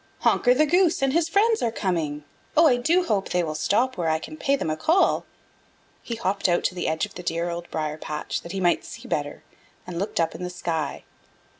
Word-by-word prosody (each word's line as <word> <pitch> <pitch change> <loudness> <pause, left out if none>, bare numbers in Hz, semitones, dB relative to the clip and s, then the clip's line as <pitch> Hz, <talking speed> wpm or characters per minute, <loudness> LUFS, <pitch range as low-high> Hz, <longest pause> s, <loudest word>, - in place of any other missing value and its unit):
"Honker 250 0 +4
the 305 +4 +4
Goose 345 -1 +3
and 270 -1 +2
his 330 0 +2
friends 435 +5 +3
are 230 - +1
coming. 165 -8 -2 0.3
Oh, 330 - +7
I 255 -6 +5
do 335 +9 +2
hope 205 - 0
they 180 0 +1
will 155 -2 -3
stop 230 +11 +1
where 170 -2 0
I 160 - +2
can 310 - -8
pay 280 -2 +1
them 160 - -2
a - - 0
call." 330 - +2 0.7
He 235 - -5
hopped 200 -3 0
out 175 - +2
to - - 0
the 180 - -3
edge 160 0 0
of - - -14
the 180 - -7
dear 170 0 -2
Old 170 0 -6
Briar 155 0 -3
patch 150 -1 -4
that 170 - -9
he 195 - -3
might 175 -2 +2
see - - -10
better, - - -3 0.4
and 175 -2 -5
looked 200 -1 -2
up 165 -1 +1
in - - -9
the 180 - -3
sky. 165 -4 -3
185 Hz, 235 wpm, -25 LUFS, 165-275 Hz, 0.7 s, Oh